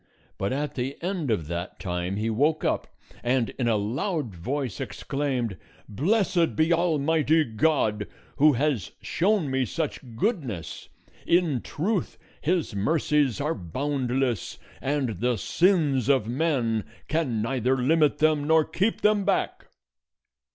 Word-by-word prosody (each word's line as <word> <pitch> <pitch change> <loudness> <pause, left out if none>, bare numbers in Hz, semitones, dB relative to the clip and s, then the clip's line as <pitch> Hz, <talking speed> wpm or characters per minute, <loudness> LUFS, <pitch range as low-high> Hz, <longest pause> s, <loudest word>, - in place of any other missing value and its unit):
But 100 - -1
at 145 +3 -2
the 130 +2 -3
end 175 -6 -2
of 105 -9 0
that 85 +4 -5
time 90 0 -2
he 105 +2 -1
woke 150 +8 +1
up, - - 0 0.3
and 125 -1 +1
in 120 - +1
a 115 - +3
loud 125 - -2
voice 125 - -3
exclaimed, 130 -8 -2 0.3
"Blessed 175 - +1
be 160 +2 +3
Almighty 160 -1 +2
God, 110 -4 +1 0.3
who 150 +1 +6
has 135 - -1
shown 185 -5 +1
me 130 0 +1
such 150 +6 -3 0.2
goodness! 125 - -3 0.4
In 170 -8 +2
truth 190 +5 -2 0.2
his 170 -6 0
mercies 145 +3 +1
are 150 +3 0
boundless, 130 - -2 0.2
and 135 -5 -1
the 120 0 +1
sins 140 - +2
of 130 -6 +3
men 120 -5 0 0.2
can 150 -8 0
neither 130 +2 +1
limit 150 +3 +3
them 155 -2 +2
nor 160 -1 +5
keep 205 +5 0
them 210 -1 +3
back!" - - -1
140 Hz, 130 wpm, -26 LUFS, 115-160 Hz, 0.4 s, who